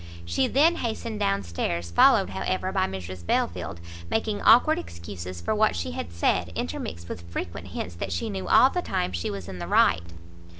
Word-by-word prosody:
She 85 +10 +1
then 320 +6 +4
hastened 225 -2 -3
down 100 0 +1
stairs, 85 0 -3
followed, 85 - +5
however, - - -2
by - - +1
Mrs 95 -2 -7
Belfield, 85 +1 -1 0.3
making 215 -2 -1
awkward 250 +7 +6
excuses 85 +1 -8
for - - 0
what 215 0 +2
she 85 0 -3
had 80 0 -5
said, 85 0 0
intermixed 85 +1 -4
with 85 0 -8
frequent 85 0 -5
hints 90 0 -5
that - - -4
she 85 - -2
knew 95 -2 -4
all 260 - +6
the 360 - -1
time 90 - -1
she 85 -1 -3
was 100 -3 -6
in 95 -2 -7
the 85 - -5
right. 85 - +4
90 Hz, 185 wpm, -26 LUFS, 85-100 Hz, 0.3 s, awkward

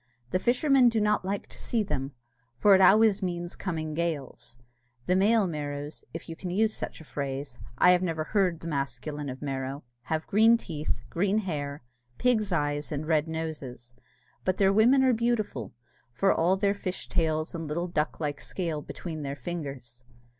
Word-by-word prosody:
The 185 - +2
fishermen 255 +2 +4
do 230 -1 0
not 210 -1 +2
like 195 +2 -2
to - - -11
see 230 -3 0
them, 135 -8 -3 0.4
for 205 +9 +6
it 190 - +6
always 210 +2 +6
means 175 -2 -3
coming 160 -4 -3
gales. 150 -7 -4 0.5
The 180 - +2
male 210 +3 +4
Merrows 145 -3 -5
(if 165 - -7
you 165 - -6
can 180 - -6
use 215 +4 +1
such - - -6
a - - -10
phrase 140 -3 -5 0.2
I 180 - +7
have 180 0 +4
never 165 -4 -1
heard 185 -2 +1
the 165 - -6
masculine 140 0 -3
of 130 +2 -7
Merrow) 135 0 -3 0.2
have 160 +2 -2
green 225 +3 +5
teeth, 155 -8 -4
green 195 +4 +1
hair, 145 - -3 0.3
pig's 220 -5 +2
eyes, 145 -2 0
and 150 +1 -3
red 155 -1 +2
noses; 150 -7 -5 0.5
but 185 0 0
their 195 -1 +4
women 245 +6 +5
are 260 -1 +4
beautiful, 220 - -1 0.4
for 195 +12 +3
all 180 +4 +2
their 200 0 +2
fish 190 -2 -5
tails 155 -1 0
and 165 -1 -4
the - - -6
little 170 +4 -2
duck 155 -3 -1
like 145 -2 -3
scale 165 -5 -3
between 160 +1 -6
their 140 -1 -4
fingers. 135 -5 -6
165 Hz, 180 wpm, -28 LUFS, 145-195 Hz, 0.5 s, I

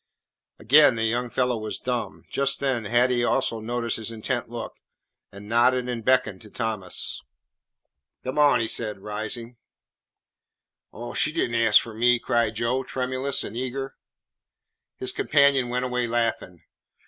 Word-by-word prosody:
Again 140 +3 +6
the 115 - -2
young 120 +2 0
fellow 125 0 0
was 110 0 -4
dumb. 120 -3 -4
Just 140 0 +1
then 130 -5 -1
Hattie 120 +2 +2
also 120 -2 0
noticed 115 +1 -2
his 115 0 -3
intent 115 +1 -3
look, 115 -1 -6 0.6
and 100 +1 -12
nodded 120 +2 +3
and 120 -2 -4
beckoned 125 -6 +2
to 110 - -13
Thomas. 110 -4 -2 1.0
"Come 130 +3 -3
on," 145 -4 +5
he 110 - 0
said, 110 -2 -2
rising. 110 +4 -6 1.3
"Oh, 120 +1 -8
she 155 - +3
did 155 -7 -1
n't - - -2
ask 110 -2 +6
for 115 - -8
me," 120 +2 +3
cried 115 -2 0
Joe, 120 +3 0
tremulous 130 +1 -2
and 105 - -7
eager. 130 +2 -4 1.0
His 130 - -2
companion 140 -4 +3
went 125 +1 -1
away 125 -1 -1
laughing. 115 -7 -2
120 Hz, 150 wpm, -25 LUFS, 115-130 Hz, 1.3 s, Again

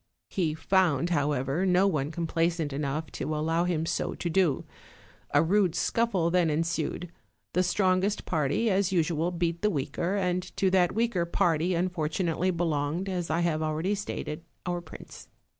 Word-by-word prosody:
He 165 -6 0
found, 175 -2 +2
however, 145 +1 0
no 185 0 +4
one 150 -7 0
complaisant 165 -2 -1
enough 145 +2 -3
to 155 - -3
allow 165 +3 +1
him 165 -3 0
so - - -2
to 170 - -3
do. 170 -5 +2 0.7
A 145 +2 +4
rude 185 0 +2
scuffle 190 -5 +1
then 175 -2 +3
ensued; 165 +2 -2 0.4
the 180 - +3
strongest 185 +2 +1
party 155 +7 0
as 195 0 +2
usual 165 -2 +1
beat 170 -1 -2
the 210 - +3
weaker, 170 +3 -2
and 180 -2 0 0.2
to 190 -1 +2
that 180 -1 +3
weaker 225 -6 +1
party 170 -1 +1
unfortunately 175 0 0
belonged 165 +1 -1
as 180 -3 -2
I 160 +2 +1
have 165 -2 0
already 155 +5 0
stated 170 -6 -4 0.2
our 175 -1 -2
prince. 165 - -12
170 Hz, 155 wpm, -28 LUFS, 155-185 Hz, 0.7 s, no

